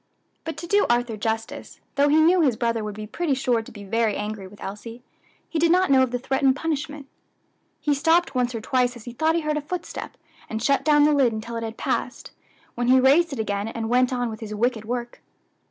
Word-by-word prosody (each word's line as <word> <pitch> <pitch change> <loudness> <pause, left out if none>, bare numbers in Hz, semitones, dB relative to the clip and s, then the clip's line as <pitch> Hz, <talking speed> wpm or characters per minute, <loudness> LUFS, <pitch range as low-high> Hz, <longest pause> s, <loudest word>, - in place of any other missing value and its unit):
But 325 - -5
to 340 - -6
do 405 +4 +2
Arthur 240 -1 +1
justice, 225 +2 -4
though 285 +1 +3
he 305 +2 +5
knew 340 +3 +5
his 265 -7 +3
brother 230 -2 0
would 210 -1 -5
be 215 0 -6
pretty 295 +6 -1
sure 250 -3 +1
to 225 - -12
be 205 -2 -10
very 220 +1 0
angry 210 -2 -5
with 205 +2 -16
Elsie, 230 +4 -8 0.4
he 325 - -2
did 335 +1 +3
not 365 -2 +3
know 265 -1 +6
of 260 - +2
the 245 - -2
threatened 265 +1 +1
punishment. 295 -2 -3 0.7
He 295 - +1
stopped 325 +3 +2
once 250 -1 0
or 225 - -4
twice 250 +1 +1
as 240 - -11
he 240 - -7
thought 315 +6 +1
he 335 - +1
heard 305 -1 -1
a - - -2
footstep, 345 +4 -6 0.3
and 220 - -3
shut 275 +5 +1
down 295 -1 +5
the 300 0 +4
lid 265 -5 +3
until 225 +2 -6
it 230 - -3
had 225 0 -6
passed, - - -3 0.4
when 240 0 -2
he 260 +1 +6
raised 295 +6 +4
it 275 - -5
again 205 -1 -2
and 225 0 -4
went 250 +1 +3
on 245 -1 -1
with 220 - -8
his 215 -2 -6
wicked 225 0 0
work. 240 +1 -5
250 Hz, 235 wpm, -24 LUFS, 225-295 Hz, 0.7 s, know